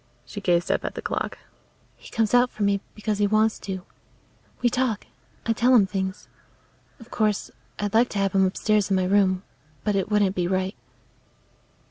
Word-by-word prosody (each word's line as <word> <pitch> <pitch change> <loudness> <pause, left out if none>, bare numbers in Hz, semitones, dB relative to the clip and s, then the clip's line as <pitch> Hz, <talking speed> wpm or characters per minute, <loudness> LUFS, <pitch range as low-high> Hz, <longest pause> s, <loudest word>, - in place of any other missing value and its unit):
She 205 - -7
gazed 175 -2 +2
up - - 0
at - - -4
the - - -4
clock. - - -3 0.6
"He - - -14
comes 225 -2 0
out 245 0 +5
for 215 - -4
me 200 -1 +2
because 215 -1 -2
he 205 - +3
wants 215 +1 +2
to. 190 -2 -5 0.8
We - - +5
talk; 245 -3 0 0.4
I 230 - +2
tell 245 +3 +4
him 210 -5 +6
things. 190 0 -4 0.7
Of 230 0 -15
course, 215 -2 0 0.3
I'd 205 0 -2
like 235 +2 +4
to - - -5
have 195 -1 +1
him 195 -1 +4
upstairs 210 +1 +1
in 195 - +2
my 185 -1 +1
room, 190 -1 +2 0.4
but 210 - 0
it 195 0 0
wouldn't 205 -2 +2
be 175 -1 0
right." 185 +2 -1
205 Hz, 185 wpm, -25 LUFS, 190-220 Hz, 0.8 s, him